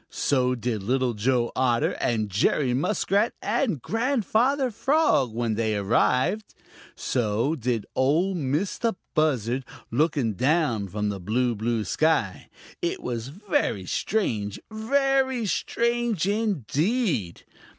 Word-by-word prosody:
So 125 -2 +1
did 115 -3 -2
Little 125 +4 0
Joe 120 +2 +1
Otter 120 -2 +2
and 110 -3 0
Jerry 120 +6 +1
Muskrat 200 - +1
and 220 - 0
Grandfather 250 +2 +1
Frog, 270 - +2
when 115 0 -1
they 110 0 0
arrived. 130 - +1 0.4
So 115 +4 0
did 120 -6 -2
Ol' 160 +9 +2
Mistah 180 - -1 0.2
Buzzard, 130 -5 +1 0.3
looking 135 -3 +1
down 130 - +1
from 105 +2 -2
the 100 -1 -4
blue, 120 +6 0
blue 115 +1 -1
sky. 160 +8 0 0.3
It 360 +2 -2
was 120 -1 -3
very 165 - -1
strange, 105 - -1
very 265 +2 +1
strange 235 -2 0
indeed! 195 - 0
135 Hz, 110 wpm, -25 LUFS, -, 0.4 s, Otter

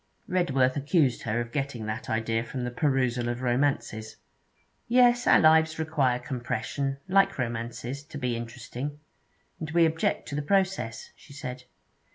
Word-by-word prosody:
Redworth 135 -9 +2
accused 145 -2 +2
her 115 +1 -1
of 120 0 -4
getting 135 -4 -3
that 110 +1 -4
idea 115 0 0
from 125 +1 -5
the 125 - -3
perusal 125 -3 +1
of 120 +1 -3
romances. 120 -4 0 0.7
'Yes, 245 0 +4
our - - +7
lives 160 0 +5
require 150 -6 +1
compression, 125 +2 -3
like 195 +1 +3
romances, 120 +2 -4
to 145 - -8
be 125 -3 -1
interesting, 120 +4 -6 0.6
and 155 - -5
we 165 +1 +4
object 160 0 0
to 140 - -4
the 150 - 0
process,' 185 - 0
she 150 -2 -16
said. 125 -2 -7
135 Hz, 150 wpm, -27 LUFS, 120-155 Hz, 0.7 s, our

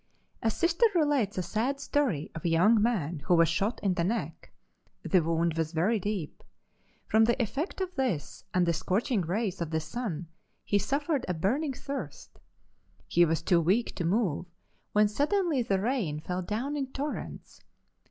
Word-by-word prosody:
A 225 - +2
Sister 340 - +3
relates 290 - +2
a 185 - 0
sad 235 +10 -1
story 275 - 0
of 160 - -7
a 170 - +1
young 205 +7 +4
man 175 -9 0
who 175 - +4
was 165 -1 +5
shot 195 +8 0
in 195 -2 +2
the 175 -2 0
neck. 225 +6 -3 0.5
The 185 -3 +3
wound 165 0 0
was 165 0 -2
very 195 +8 +2
deep. 200 -5 -4 0.6
From 220 0 +4
the 235 +3 +1
effect 275 - -2
of 370 -1 -3
this 255 - -2
and 180 -1 +2
the 170 - +2
scorching 195 +7 0
rays 190 +2 -2
of 165 - -2
the 160 0 0
sun 170 0 -4 0.4
he 205 - +2
suffered 280 - -1
a 180 - -1
burning 265 - 0
thirst. 250 - -7 0.7
He 175 0 +4
was 165 0 0
too 170 -1 +3
weak 195 +9 +1
to 175 - -4
move, 180 -2 0 0.4
when 210 0 +4
suddenly 300 - +1
the 195 -5 +1
rain 205 - -1
fell 180 +3 -3
down 230 +10 -3
in 275 -2 -2
torrents. 290 +3 -6
205 Hz, 170 wpm, -29 LUFS, 170-260 Hz, 0.7 s, was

